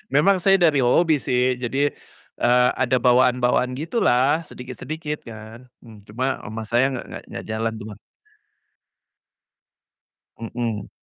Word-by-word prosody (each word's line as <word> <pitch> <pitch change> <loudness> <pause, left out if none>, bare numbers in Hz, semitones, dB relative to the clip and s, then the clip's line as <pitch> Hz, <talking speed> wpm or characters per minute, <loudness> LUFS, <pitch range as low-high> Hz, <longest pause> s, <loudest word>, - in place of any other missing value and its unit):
memang 190 +7 +4
saya 195 +2 +4
dari 165 -6 +3
hobi 150 +5 +3
sih 125 -1 0
jadi, 135 +4 0 0.5
eee, 125 +1 +4
ada 130 0 +2
bawaan-bawaan 125 0 +3
gitulah 145 - +1
sedikit-sedikit 150 +5 -6
kan, 115 +2 -11 0.2
mmm, 110 -3 -15
cuma 130 +5 -2
ama 110 +1 -5
saya 120 +4 +2
nggak 130 - -5
nggak - - -8
nggak - - -7
jalan 110 +1 -1
tuh, 105 - -8
Bang. 105 - -12 2.4
Hmm. 115 -2 -4
125 Hz, 125 wpm, -22 LUFS, 115-145 Hz, 2.4 s, memang